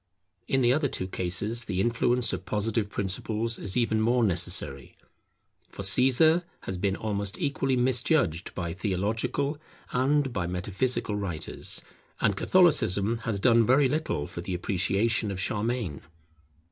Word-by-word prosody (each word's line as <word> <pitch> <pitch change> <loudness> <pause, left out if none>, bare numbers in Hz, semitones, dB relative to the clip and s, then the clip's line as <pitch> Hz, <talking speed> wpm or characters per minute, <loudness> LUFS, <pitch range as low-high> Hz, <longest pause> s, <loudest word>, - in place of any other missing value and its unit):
In 135 - +2
the 120 +1 +5
other 145 +1 +1
two 95 -7 -3
cases 95 +6 -2
the 95 -4 -2
influence 120 +3 +1
of - - -4
Positive 105 0 -1
principles 110 +4 -1
is 100 +1 -2
even 115 -2 +2
more 120 +2 +2
necessary. 90 - -1 0.7
For 100 - -7
Caesar 135 - +4 0.2
has 95 - -5
been 95 +1 0
almost 100 -2 -3
equally 135 -4 0
misjudged 125 - +1
by 85 -2 -3
theological 110 - -1 0.3
and 135 +1 +1
by 90 -6 -2
metaphysical 100 +6 -2
writers; 95 -6 -4 0.4
and - - +2
Catholicism 115 - +3
has 110 -3 -1
done 115 +1 +5
very 130 +5 +4
little 140 - -1
for 85 - -7
the 90 +1 -4
appreciation 100 +5 0
of 95 -1 -4
Charlemagne. 105 - -2
110 Hz, 135 wpm, -27 LUFS, 95-125 Hz, 0.7 s, the